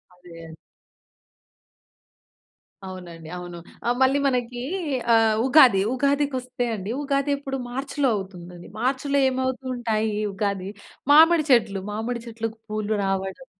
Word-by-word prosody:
అదే. 165 Hz, -2 st, -12 dB, 2.4 s
అవునండవును. 175 Hz, -1 st, -8 dB, 0.3 s
ఆ -, -, +3 dB
మళ్ళీ 265 Hz, +2 st, +4 dB
మనకి 245 Hz, -2 st, -2 dB, 0.5 s
ఆహ్, 225 Hz, -1 st, +4 dB
ఉగాది. 255 Hz, -8 st, +6 dB
ఉగాదికి 280 Hz, +1 st, +1 dB
వస్తే 250 Hz, -1 st, -4 dB
అండి 200 Hz, +1 st, -5 dB
ఉగాది 280 Hz, 0 st, 0 dB
ఎప్పుడు 270 Hz, -1 st, -5 dB
మార్చ్‌లో 270 Hz, +2 st, -1 dB
అవుతుందది. 180 Hz, -3 st, -8 dB
మార్చ్‌లో 270 Hz, +3 st, 0 dB
ఏమవుతుంటాయి 250 Hz, -4 st, -2 dB, 0.2 s
ఉగాది 195 Hz, -1 st, -2 dB, 0.4 s
మామిడి 320 Hz, +2 st, +7 dB
చెట్లు 220 Hz, -6 st, +3 dB
మామిడి 230 Hz, +3 st, -3 dB
చెట్లకు 225 Hz, -1 st, -5 dB
పూలు 215 Hz, 0 st, -2 dB
రావడం, 195 Hz, +6 st, -3 dB
230 Hz, 100 wpm, -24 LUFS, 195-265 Hz, 2.4 s, మామిడి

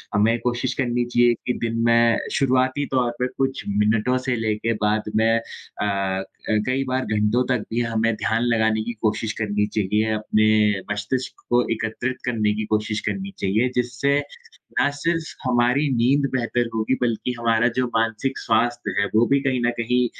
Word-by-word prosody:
हमें 110 Hz, +3 st, +3 dB
कोशिश 125 Hz, +1 st, -1 dB
करनी 120 Hz, -1 st, 0 dB
चाहिए 120 Hz, 0 st, +3 dB
कि 125 Hz, -, +2 dB
दिन 115 Hz, 0 st, -1 dB
में 115 Hz, 0 st, +4 dB, 0.2 s
शुरुआती 130 Hz, +1 st, +2 dB
तौर 120 Hz, -2 st, +2 dB
पर 125 Hz, -, +1 dB
कुछ 135 Hz, 0 st, -1 dB
मिनटों 110 Hz, +5 st, +2 dB
से 125 Hz, -, +2 dB
लेके 110 Hz, +2 st, 0 dB
बाद 105 Hz, 0 st, -1 dB
में 110 Hz, +1 st, +3 dB, 0.5 s
अ 105 Hz, -, +1 dB
अ, 95 Hz, -1 st, -1 dB, 0.4 s
कई 130 Hz, +1 st, 0 dB
बार 130 Hz, 0 st, -1 dB
घंटों 105 Hz, +4 st, +2 dB
तक 125 Hz, -4 st, +1 dB
भी 120 Hz, -, +1 dB
हमें 115 Hz, -1 st, 0 dB
ध्यान 105 Hz, +4 st, 0 dB
लगाने 110 Hz, -2 st, +2 dB
की 120 Hz, +1 st, -4 dB
कोशिश 110 Hz, 0 st, 0 dB
करनी 105 Hz, -1 st, 0 dB
चाहिए, 105 Hz, +1 st, 0 dB
अपने 105 Hz, -1 st, +2 dB
मस्तिष्क 105 Hz, +5 st, -3 dB
को 120 Hz, 0 st, +4 dB
एकत्रित 115 Hz, +3 st, -3 dB
करने 110 Hz, -4 st, +1 dB
की 110 Hz, 0 st, -2 dB
कोशिश 105 Hz, 0 st, 0 dB
करनी 195 Hz, 0 st, -3 dB
चाहिए, 110 Hz, +6 st, +1 dB
जिससे 125 Hz, +3 st, +1 dB, 0.6 s
ना -, -, +4 dB
सिर्फ 165 Hz, -1 st, -1 dB
हमारी 125 Hz, +4 st, +2 dB
नींद 135 Hz, +4 st, +3 dB
बेहतर 120 Hz, 0 st, 0 dB
होगी 110 Hz, +4 st, +1 dB
बल्कि 120 Hz, +1 st, 0 dB
हमारा 115 Hz, 0 st, +2 dB
जो 130 Hz, -1 st, +2 dB
मानसिक 115 Hz, +4 st, 0 dB
स्वास्थ्य 115 Hz, -1 st, 0 dB
है, 100 Hz, -, +2 dB
वो 115 Hz, +2 st, +5 dB
भी 140 Hz, -, +3 dB
कहीं 130 Hz, -3 st, 0 dB
न -, -, +3 dB
कहीं 125 Hz, +2 st, +2 dB
115 Hz, 170 wpm, -23 LUFS, 110-125 Hz, 0.6 s, वो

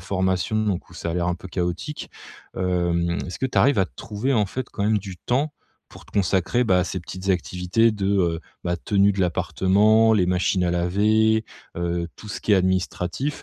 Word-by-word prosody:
formation 95 Hz, +2 st, -1 dB
donc 105 Hz, -6 st, -1 dB
où -, -, -14 dB
ça 85 Hz, -, -5 dB
a -, -, -3 dB
l'air 90 Hz, 0 st, 0 dB
un 90 Hz, -, 0 dB
peu 90 Hz, +2 st, -10 dB
chaotique, 90 Hz, -, -4 dB, 0.5 s
hem, 85 Hz, -2 st, 0 dB
est-ce 90 Hz, -, -7 dB
que 130 Hz, -, 0 dB
tu 130 Hz, -, -8 dB
arrives 140 Hz, -3 st, +4 dB
à 95 Hz, -, +3 dB
te -, -, -26 dB
trouver 110 Hz, +6 st, -2 dB
en 110 Hz, -3 st, +3 dB
fait 125 Hz, +6 st, -5 dB
quand 100 Hz, -, -4 dB
même 105 Hz, 0 st, +3 dB
du 95 Hz, -2 st, -8 dB
temps 140 Hz, -, -1 dB, 0.3 s
pour -, -, -14 dB
te -, -, -21 dB
consacrer, 100 Hz, +5 st, +1 dB
bah, 95 Hz, -6 st, +3 dB
à 90 Hz, -, +2 dB
ces 95 Hz, +1 st, -4 dB
petites 95 Hz, +3 st, -4 dB
activités 90 Hz, +5 st, +1 dB
de, 105 Hz, -3 st, -3 dB
heu, 90 Hz, -5 st, +1 dB, 0.2 s
bah, 85 Hz, 0 st, -1 dB
de -, -, -18 dB
tenue 100 Hz, -1 st, +3 dB
de 100 Hz, -, -2 dB
l'appartement, 105 Hz, +5 st, +3 dB
les 100 Hz, -5 st, +3 dB
machines 90 Hz, +1 st, +1 dB
à 90 Hz, -, +1 dB
laver, 105 Hz, +5 st, +2 dB, 0.3 s
heu, 85 Hz, 0 st, -1 dB
tout 105 Hz, -, -12 dB
ce -, -, -5 dB
qui 105 Hz, -, +1 dB
est -, -, +8 dB
administratif? 95 Hz, -, -1 dB
95 Hz, 215 wpm, -23 LUFS, 90-110 Hz, 0.5 s, est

